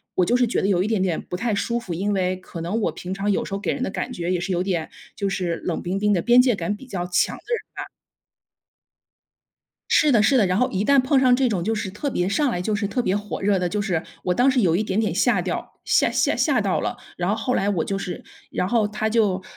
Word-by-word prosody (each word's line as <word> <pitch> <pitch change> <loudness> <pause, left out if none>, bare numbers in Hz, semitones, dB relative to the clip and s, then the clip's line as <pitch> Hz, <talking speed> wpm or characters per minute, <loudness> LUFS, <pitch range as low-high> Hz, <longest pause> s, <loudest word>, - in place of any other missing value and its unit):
我 180 - +3
就 240 - +2
是 250 - +3
觉 230 - 0
得 - - +1
有 185 -2 +2
一 - - -2
点 220 -4 0
点 180 -4 0
不 180 - -6
太 225 +2 -1
舒 235 +4 -1
服， 190 -7 -6
因 205 +4 -1
为 185 -1 0
可 175 -2 -9
能 185 +7 -2
我 - - +1
平 180 - -8
常 200 +1 -1
有 - - 0
时 - - -7
候 200 - -3
给 - - -1
人 265 - -5
的 - - -1
感 250 - -4
觉 175 -4 -3
也 180 - +1
是 185 +2 -3
有 180 0 0
点 175 -4 -1 0.3
就 200 - -2
是 185 -3 -1
冷 175 - -2
冰 185 +2 -2
冰 210 +1 +2
的 175 - +1
边 245 +1 +5
界 250 -1 +5
感 205 +1 -2
比 265 - -12
较 180 -7 -4
强 175 - +1
的 - - -15
人 475 - 0 0.2
吧。 - - -6 2.0
是 300 -3 +4
的 215 -3 +5
是 270 +4 +4
的， 210 -6 +4
然 185 +2 +1
后 250 - +2
一 195 +2 -1
旦 280 +2 +5
碰 265 +2 +2
上 255 -1 +5
这 255 -1 +2
种 185 -6 -1
就 225 +3 0
是 210 -3 -3
特 270 +9 -3
别 180 -4 0
上 280 +7 +1
来 180 - -2
就 210 +3 -1
是 205 0 -1
特 200 +5 -2
别 195 -3 +1
火 205 0 -5
热 200 -1 +2
的， 180 - 0
就 210 +4 -2
是 180 -6 -1 0.2
我 180 - 0
当 250 +6 +4
时 255 -2 +2
有 170 -5 +3
一 210 - +1
点 205 0 0
点 210 -7 -1
吓 215 0 +2
掉 175 0 -4
吓 - - +3
吓 - - +1
吓 - - +2
到 - - 0
了， - - -3 0.2
然 175 0 -2
后 210 - +2
后 250 +3 -1
来 200 +1 +1
我 170 -5 0
就 195 - -2
是， 180 -2 -5 0.3
然 180 - -1
后 220 -1 +2
他 215 +1 -2
就 210 -4 +1
200 Hz, 305 characters per minute, -23 LUFS, 180-230 Hz, 2.0 s, 边